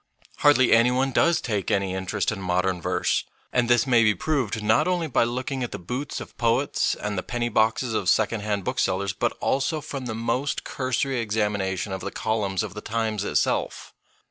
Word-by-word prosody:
Hardly 140 Hz, -4 st, +5 dB
any 115 Hz, +2 st, +6 dB
one 130 Hz, +2 st, +1 dB
does 170 Hz, +6 st, +3 dB
take 105 Hz, -5 st, -2 dB
any 95 Hz, -2 st, 0 dB
interest 95 Hz, +1 st, -1 dB
in 100 Hz, -2 st, -5 dB
modern 90 Hz, 0 st, 0 dB
verse, -, -, 0 dB, 0.3 s
and 125 Hz, -1 st, +2 dB
this 120 Hz, -1 st, +4 dB
may 120 Hz, -3 st, +4 dB
be 105 Hz, -1 st, +3 dB
proved 120 Hz, -, -1 dB
not 110 Hz, +9 st, +3 dB
only 180 Hz, -2 st, 0 dB
by 140 Hz, -, +2 dB
look 125 Hz, +3 st, -3 dB
ing 135 Hz, -2 st, -2 dB
at 120 Hz, -, -4 dB
the -, -, -4 dB
boots 125 Hz, +11 st, -4 dB
of -, -, -10 dB
poets 120 Hz, +4 st, +1 dB
and 105 Hz, -2 st, -3 dB
the -, -, -2 dB
penny 120 Hz, +2 st, -2 dB
boxes 110 Hz, +2 st, +1 dB
of 95 Hz, -4 st, 0 dB
secondhand 105 Hz, -2 st, +1 dB
booksellers, 95 Hz, +1 st, 0 dB
but -, -, -1 dB
also 140 Hz, +4 st, 0 dB
from 140 Hz, -3 st, -6 dB
the 110 Hz, -, -3 dB
most 125 Hz, +5 st, -1 dB
cursory 130 Hz, 0 st, -1 dB
examination 105 Hz, -4 st, -1 dB
of 95 Hz, -, -4 dB
the -, -, -4 dB
columns 105 Hz, -4 st, -1 dB
of -, -, -6 dB
the 105 Hz, -, -7 dB
Times 110 Hz, -2 st, -2 dB
itself. -, -, -1 dB
115 Hz, 195 wpm, -25 LUFS, 100-130 Hz, 0.3 s, any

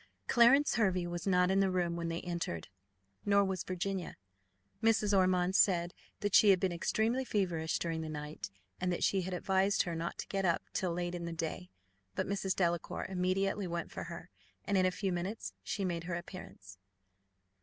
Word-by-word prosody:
Clarence 265 Hz, +5 st, +5 dB
Hervey 185 Hz, -5 st, +2 dB
was 175 Hz, +2 st, -4 dB
not 180 Hz, -1 st, +4 dB
in 195 Hz, -, +3 dB
the 195 Hz, -1 st, +3 dB
room 175 Hz, -2 st, 0 dB
when 170 Hz, 0 st, -3 dB
they 165 Hz, 0 st, -3 dB
entered, 170 Hz, -, -4 dB, 0.5 s
nor 200 Hz, 0 st, +4 dB
was 190 Hz, -2 st, -2 dB
Virginia: 185 Hz, 0 st, -3 dB, 0.6 s
Mrs. 215 Hz, -2 st, +3 dB
Ormond 185 Hz, -1 st, +3 dB
said 175 Hz, -3 st, +3 dB, 0.3 s
that 205 Hz, -1 st, -1 dB
she 210 Hz, -, +7 dB
had 190 Hz, -2 st, +6 dB
been 190 Hz, -1 st, +1 dB
extremely 220 Hz, +8 st, 0 dB
feverish 175 Hz, -9 st, 0 dB
during 165 Hz, -1 st, -2 dB
the 160 Hz, -, -5 dB
night, 150 Hz, -6 st, -6 dB, 0.3 s
and 180 Hz, 0 st, 0 dB
that 175 Hz, -, -1 dB
she 195 Hz, -, +3 dB
had 185 Hz, +1 st, -4 dB
advised 190 Hz, +2 st, +2 dB
her 175 Hz, -, -4 dB
not 165 Hz, +1 st, -3 dB
to -, -, -5 dB
get 195 Hz, -1 st, -1 dB
up 170 Hz, -3 st, +2 dB
till 185 Hz, -2 st, 0 dB
late 175 Hz, +1 st, -2 dB
in 175 Hz, -1 st, -4 dB
the 170 Hz, -, -4 dB
day. 160 Hz, -, -4 dB, 0.5 s
But -, -, 0 dB
Mrs. 195 Hz, -1 st, -1 dB
Delacour 175 Hz, -2 st, -1 dB
immediately 190 Hz, +1 st, 0 dB
went 170 Hz, 0 st, -4 dB
for -, -, -5 dB
her, -, -, -9 dB, 0.3 s
and 200 Hz, -, 0 dB
in 185 Hz, -1 st, +4 dB
a -, -, +1 dB
few 190 Hz, +1 st, -2 dB
minutes 185 Hz, +6 st, -4 dB
she 200 Hz, -, -2 dB
made 170 Hz, -2 st, -2 dB
her 175 Hz, -1 st, -2 dB
appearance. 95 Hz, -, -9 dB
180 Hz, 190 wpm, -33 LUFS, 170-195 Hz, 0.6 s, she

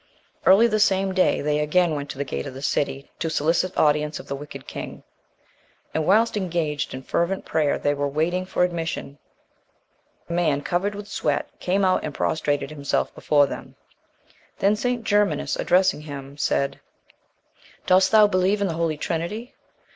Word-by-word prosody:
Early 200 Hz, +5 st, +7 dB
the 215 Hz, -2 st, +1 dB
same 195 Hz, -2 st, +2 dB
day, 185 Hz, -1 st, +2 dB
they 150 Hz, 0 st, 0 dB
again 165 Hz, +3 st, +2 dB
went 145 Hz, -1 st, -4 dB
to -, -, -7 dB
the 140 Hz, -, -1 dB
gate 140 Hz, -, -4 dB
of 130 Hz, -, -8 dB
the 135 Hz, -, -8 dB
city, 140 Hz, 0 st, -1 dB
to 165 Hz, -, -1 dB
solicit 165 Hz, +4 st, 0 dB
audience 150 Hz, 0 st, +2 dB
of -, -, -11 dB
the 140 Hz, -, -3 dB
wicked 145 Hz, +1 st, -9 dB
king; -, -, -7 dB, 0.9 s
and, 155 Hz, -1 st, -1 dB
whilst 220 Hz, +5 st, +4 dB
engaged 165 Hz, -8 st, -2 dB
in 130 Hz, -, -8 dB
fervent 170 Hz, +7 st, -1 dB
prayer 150 Hz, -3 st, +1 dB
they 145 Hz, -, 0 dB
were 145 Hz, 0 st, -1 dB
waiting 170 Hz, +6 st, -1 dB
for 180 Hz, -, +1 dB
admission, 165 Hz, -5 st, -3 dB, 1.1 s
a -, -, -4 dB
man, 155 Hz, -5 st, +1 dB
covered 195 Hz, +4 st, -1 dB
with 205 Hz, 0 st, -7 dB
sweat, 150 Hz, -7 st, -1 dB
came 195 Hz, +2 st, +1 dB
out, 185 Hz, -, +2 dB
and 150 Hz, -, -5 dB
prostrated 145 Hz, -2 st, -1 dB
himself 145 Hz, -2 st, -1 dB
before 145 Hz, -1 st, +3 dB
them. 135 Hz, -, -8 dB, 0.8 s
Then 200 Hz, +2 st, +3 dB
St. 245 Hz, +2 st, -1 dB
Germanus, 205 Hz, -2 st, +1 dB
addressing 185 Hz, -3 st, +2 dB
him, 140 Hz, -2 st, -8 dB
said 140 Hz, -1 st, 0 dB, 1.1 s
"Dost 190 Hz, +1 st, +5 dB
thou 215 Hz, 0 st, +7 dB
believe 195 Hz, 0 st, +2 dB
in 200 Hz, -, +1 dB
the 170 Hz, -, -2 dB
Holy 165 Hz, -2 st, -1 dB
Trinity?" 180 Hz, -, -4 dB
170 Hz, 170 wpm, -24 LUFS, 145-190 Hz, 1.1 s, Early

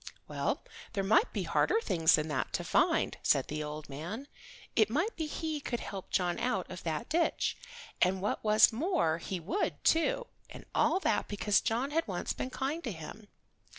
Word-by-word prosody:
"Well, -, -, -2 dB, 0.3 s
there 195 Hz, -3 st, 0 dB
might 215 Hz, -, +4 dB
be -, -, -2 dB
harder 445 Hz, -, +2 dB
things 165 Hz, -, +4 dB
than 150 Hz, 0 st, -1 dB
that 130 Hz, -4 st, -2 dB
to -, -, -1 dB
find," -, -, +2 dB
said -, -, +2 dB
the 150 Hz, 0 st, -2 dB
old 150 Hz, 0 st, -6 dB
man. 175 Hz, -, -6 dB, 0.5 s
It 215 Hz, -1 st, +4 dB
might 325 Hz, -, 0 dB
be 320 Hz, -2 st, -2 dB
he 315 Hz, 0 st, -3 dB
could 240 Hz, -3 st, -3 dB
help 195 Hz, -2 st, -7 dB
John 175 Hz, -2 st, 0 dB
out 210 Hz, -7 st, 0 dB
of 185 Hz, -, -7 dB
that 155 Hz, -3 st, -3 dB
ditch, 335 Hz, +1 st, +1 dB, 0.5 s
and 185 Hz, +1 st, +3 dB
what 200 Hz, -, -2 dB
was 215 Hz, +1 st, +6 dB
more 245 Hz, -, +1 dB
he 185 Hz, +2 st, -4 dB
would, 190 Hz, -, -2 dB
too, -, -, +3 dB, 0.2 s
and -, -, -11 dB
all 310 Hz, +5 st, +3 dB
that 215 Hz, -, +1 dB
because 205 Hz, 0 st, +2 dB
John 240 Hz, +6 st, -1 dB
had 325 Hz, +2 st, 0 dB
once 180 Hz, -3 st, -2 dB
been 255 Hz, -, -4 dB
kind 280 Hz, +6 st, -3 dB
to 240 Hz, -, -2 dB
him. 195 Hz, +5 st, -9 dB
215 Hz, 185 wpm, -31 LUFS, -, 0.5 s, was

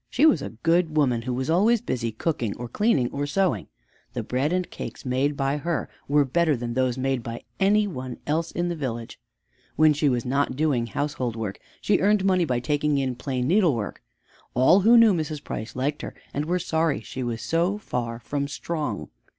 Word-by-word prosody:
She 285 Hz, -, +3 dB
was 175 Hz, -, +5 dB
a -, -, -4 dB
good 165 Hz, -1 st, +2 dB
woman 125 Hz, -6 st, +3 dB
who 125 Hz, +2 st, -3 dB
was 130 Hz, +1 st, -2 dB
always 210 Hz, +8 st, +4 dB
busy 115 Hz, -, -2 dB
cooking, 115 Hz, -2 st, -2 dB
or 120 Hz, -, -5 dB
cleaning, 145 Hz, -, +1 dB
or 145 Hz, +1 st, -2 dB
sewing. 190 Hz, +4 st, 0 dB, 0.5 s
The -, -, -3 dB
bread 135 Hz, +5 st, 0 dB
and 180 Hz, 0 st, 0 dB
cakes -, -, -8 dB
made 135 Hz, +3 st, 0 dB
by 135 Hz, +1 st, 0 dB
her 165 Hz, +1 st, -2 dB, 0.2 s
were 145 Hz, 0 st, +4 dB
better 155 Hz, +1 st, +2 dB
than 120 Hz, 0 st, -4 dB
those 130 Hz, 0 st, +1 dB
made 135 Hz, -1 st, 0 dB
by 115 Hz, 0 st, -7 dB, 0.2 s
any 205 Hz, +2 st, +4 dB
one 130 Hz, -10 st, -5 dB
else 160 Hz, +3 st, 0 dB
in 175 Hz, +1 st, -1 dB
the 175 Hz, -, -2 dB
village. 120 Hz, -6 st, -5 dB, 0.6 s
When 155 Hz, -1 st, +5 dB
she 145 Hz, 0 st, +2 dB
was 120 Hz, -2 st, 0 dB
not 135 Hz, +1 st, 0 dB
doing 135 Hz, -5 st, +1 dB
household 125 Hz, -1 st, -2 dB
work, 110 Hz, -4 st, -4 dB, 0.2 s
she 205 Hz, -, +2 dB
earned 205 Hz, 0 st, +3 dB
money 185 Hz, -2 st, +3 dB
by 125 Hz, -5 st, -1 dB
taking 150 Hz, +1 st, +1 dB
in 135 Hz, -2 st, 0 dB
plain 125 Hz, 0 st, -2 dB
needlework. 160 Hz, -, +1 dB, 0.5 s
All 130 Hz, +10 st, +6 dB
who 225 Hz, +5 st, +6 dB
knew 230 Hz, -3 st, +7 dB
Mrs. 155 Hz, -3 st, -3 dB
Price 110 Hz, +1 st, -6 dB
liked 145 Hz, +4 st, -1 dB
her -, -, -7 dB, 0.2 s
and 145 Hz, +2 st, -1 dB
were 175 Hz, +3 st, +1 dB
sorry 160 Hz, -3 st, 0 dB
she 130 Hz, -, -7 dB
was 120 Hz, -2 st, -3 dB
so 175 Hz, +5 st, +1 dB
far 120 Hz, -, -3 dB
from 140 Hz, +3 st, -3 dB
strong. 145 Hz, -5 st, -4 dB
145 Hz, 200 wpm, -25 LUFS, 125-170 Hz, 0.6 s, knew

